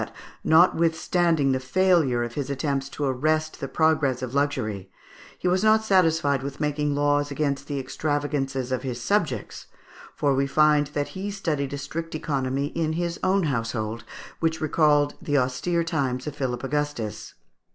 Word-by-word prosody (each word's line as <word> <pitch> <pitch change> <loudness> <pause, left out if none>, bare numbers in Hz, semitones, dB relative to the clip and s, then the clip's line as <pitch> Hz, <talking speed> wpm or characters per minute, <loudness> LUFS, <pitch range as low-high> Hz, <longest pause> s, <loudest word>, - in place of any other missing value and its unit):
50) - - -5
that, - - -14 0.2
notwithstanding 165 -2 +3
the 130 - +1
failure 145 -3 +2
of 120 0 -5
his 140 0 -3
attempts 140 -1 -2
to 145 - -5
arrest 155 +4 0
the 135 - -4
progress 145 -5 +1
of 125 0 -5
luxury, 120 -9 -1 0.5
he - - -2
was 185 +2 +2
not 220 0 +5
satisfied 165 -9 +3
with 140 0 -6
making 150 -1 0
laws 145 0 +2
against 140 -1 -2
the 145 - -3
extravagances 135 -2 -2
of 130 - 0
his 125 -3 -4
subjects, 150 - -1 0.5
for 140 -1 +2
we 135 +1 +1
find 150 0 +4
that 145 -1 -1
he 195 +2 -5
studied 155 -9 -2
a 140 - -3
strict 160 +4 -5
economy 140 -2 -1
in 160 -1 -1
his 170 0 -2
own 195 0 +2
household, 115 -5 -2 0.4
which 160 -1 0
recalled 150 -2 +3
the 145 -1 0
austere 140 +7 0
times 135 -6 -1
of 150 - -5
Philip 130 -3 -3
Augustus. 145 -6 -3
145 Hz, 160 wpm, -25 LUFS, 135-160 Hz, 0.5 s, not